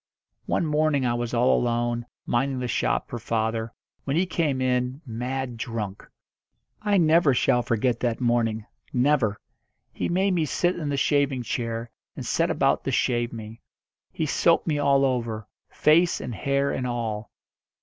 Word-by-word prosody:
One 170 - +1
morning 150 -3 +1
I 120 - +1
was 120 -1 -2
all 125 +1 +3
alone, 120 0 0 0.2
minding 135 +2 0
the 125 -1 -2
shop - - 0
for 120 - -5
father, 110 0 -1 0.3
when 140 - -1
he 175 +3 +3
came 155 -7 0
in, 125 +1 0
mad 125 +1 -4
drunk. 110 -3 -5 0.7
I 205 -1 +2
never 160 -4 +4
shall 125 0 +3
forget 120 +1 0
that 120 -2 -1
morning, 115 -3 +1 0.3
never. 125 -5 +2 0.6
He - - -2
made 190 +3 +2
me 165 -3 +1
sit 175 +4 0
in 155 -4 -3
the 140 - -1
shaving 140 -2 +1
chair, 115 0 -3 0.2
and - - -6
set - - +1
about - - +2
to - - 0
shave 120 -1 +1
me. 115 0 -9 0.5
He 160 - -2
soaped 165 +3 +3
me 150 -3 0
all 140 -1 +4
over 115 -5 -2 0.2
face 170 +3 +3
and 120 - -5
hair 140 +4 0
and 125 - -2
all. 115 -3 -3
125 Hz, 160 wpm, -25 LUFS, 115-145 Hz, 0.7 s, never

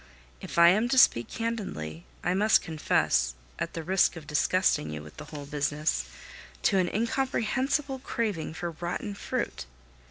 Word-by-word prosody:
If - - -7
I 170 0 +9
am 215 +6 +3
to 260 - +1
speak 120 - +6
candidly, 190 - -4 0.2
I 175 - +1
must 210 +3 +4
confess, 150 - +1 0.2
at - - -3
the 165 - -4
risk 185 +1 +3
of 160 -3 -9
disgusting 150 - +2
you 75 0 -6
with 75 - -13
the - - -8
whole 145 -2 -8
business, 145 - -1 0.6
to 195 - +3
an 180 - +1
incomprehensible 265 +4 0
craving 210 -11 -3
for 170 +1 -3
rotten 175 +5 -4
fruit. 130 - -4
175 Hz, 155 wpm, -28 LUFS, 150-220 Hz, 0.6 s, I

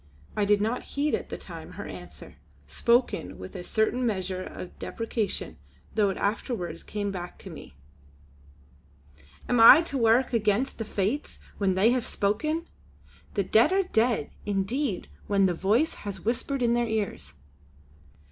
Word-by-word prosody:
I 205 - +2
did 205 0 +3
not 225 +4 0 0.2
heed 295 +1 +1
at - - -2
the - - -5
time - - -10
her - - -7
answer, - - -10 0.3
spoken 235 - +1
with 95 0 -9
a 180 - -5
certain 220 +6 0
measure 190 -5 -1
of 180 - -8
deprecation, 225 - -3 0.3
though 210 -2 +3
it 190 - -3
afterwards 200 -5 -2
came 205 -1 -3
back 180 -2 -6
to - - -10
me: 70 - -11 1.7
"Am 245 - +2
I 260 +8 +10
to 280 -5 -3
wark 235 +3 +3
against 220 +3 +1
the 225 - -2
Fates 215 +8 -2 0.2
when 195 -2 +2
They 205 +5 +4
have 250 -1 +1
spoken! 305 +12 -1 0.7
The 200 - +2
Dead 225 - +4
are 390 +1 +3
dead 230 - +1
indeed 205 +3 -1 0.2
when 200 -1 +3
the 180 - +2
Voice 215 - +2
has 200 -2 -6
whispered 250 +3 -1
in 235 0 +3
their 240 0 +1
ears!" 200 - -3
220 Hz, 155 wpm, -27 LUFS, 195-245 Hz, 1.7 s, I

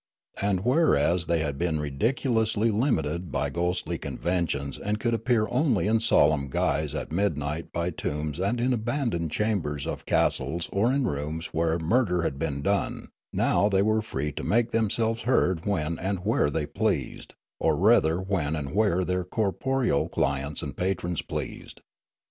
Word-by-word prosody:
And, 100 -2 +1
whereas 90 - +3
they 85 -2 +1
had 70 -3 -3
been 85 -3 0
ridiculously 110 - +1
limited 85 - 0
by 70 0 -1
ghostly 85 +3 -1
conventions 80 -7 -2
and 105 +1 -2
could 120 +1 0
appear 115 -1 +2
only 125 - +2
in 110 +2 +3
solemn 75 -10 +3
guise 75 +3 0
at 75 - -4
midnight 80 -4 -1
by 85 +1 -1
tombs 75 0 -3
and 100 +6 0
in 125 +2 +2
abandoned 115 - -1
chambers 80 -6 -1
of - - -5
castles 85 +1 +1
or 110 +5 +2
in 135 -1 +1
rooms 75 0 -3
where 80 0 +1
murder 90 0 +1
had 70 -4 -2
been 70 -3 -2
done, 100 +3 -1 0.2
now 100 - +2
they 95 -1 +3
were 110 +1 +2
free 75 -8 -3
to - - -6
make 115 +2 +1
themselves 115 +1 0
heard 95 -8 +1
when 85 -5 -1
and 95 0 -3
where 105 -9 +2
they 75 +1 -1
pleased, 95 - -2 0.2
or 80 - +2
rather 90 -3 +4
when 95 -6 -1
and 75 -1 -4
where 95 -3 +2
their 90 0 -1
corporeal 110 - 0
clients 70 +1 -1
and - - -5
patrons 90 -2 -1
pleased. - - -6
90 Hz, 160 wpm, -26 LUFS, 75-110 Hz, 0.2 s, rather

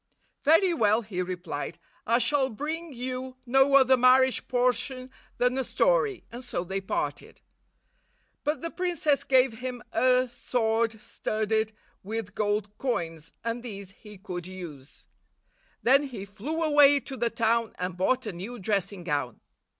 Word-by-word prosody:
"Very 330 +5 +5
well," 220 -5 +3
he 195 -4 -3
replied; 180 0 -4 0.3
"I 235 - +4
shall 265 +3 +2
bring 310 +7 -4
you 255 0 -5
no 270 +2 +4
other 265 -1 +7
marriage 255 +1 +4
portion 255 +1 0 0.3
than 250 +1 +2
a - - +1
story," 475 - +1
and 240 +2 -8
so 210 -8 -3
they 190 +2 -3
parted. 340 - -4 1.0
But 300 -1 -1
the 335 - -3
princess 340 -6 0
gave 255 -4 +3
him 250 -1 -5
a 255 0 +3
sword 225 -2 0
studded 220 0 -1 0.3
with 210 0 -5
gold 205 -1 -1
coins, 165 - -3
and 230 +1 -2
these 200 -5 -8
he 210 +1 -13
could 180 -3 -6
use. 170 -5 -10 0.8
Then 275 +4 +5
he 230 -7 -7
flew 235 +12 -4
away 290 -2 +6
to 270 - -8
the 235 -2 0
town 230 0 0
and 180 0 -3
bought 250 +8 +1
a 210 - -4
new 200 +8 -7
dressing 200 -2 -1
gown. 145 -7 -2
235 Hz, 145 wpm, -27 LUFS, 200-265 Hz, 1.0 s, other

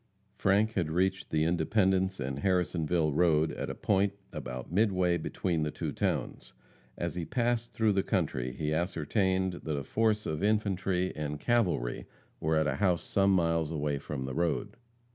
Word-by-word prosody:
Frank 105 +3 +2
had 85 -7 0
reached 95 +3 0
the 80 0 +1
Independence 95 +3 +1
and 65 +1 -3
Harrisonville 85 -3 +1
road 80 -1 +3
at - - -4
a - - -4
point 100 0 +1 0.2
about 65 +2 -6
midway 90 -3 +2
between 85 0 -2
the 75 - 0
two - - -4
towns. - - -2 0.4
As 85 0 -2
he 85 - -3
passed 120 +3 -1
through 110 -2 +2
the 95 - +2
country 65 -8 -1
he 75 +4 -2
ascertained 95 +2 0
that 75 -2 -3
a 70 - -3
force 110 +6 +1
of 75 -1 -2
infantry 95 -3 0
and 75 -1 -4
cavalry 95 - 0 0.3
were 80 +1 +1
at 80 0 +3
a - - 0
house 90 -4 +2
some 100 0 +2
miles 85 -3 +2
away 75 -2 -1
from 70 -1 -5
the 65 0 -4
road. 85 +6 -1
90 Hz, 165 wpm, -30 LUFS, 80-100 Hz, 0.4 s, road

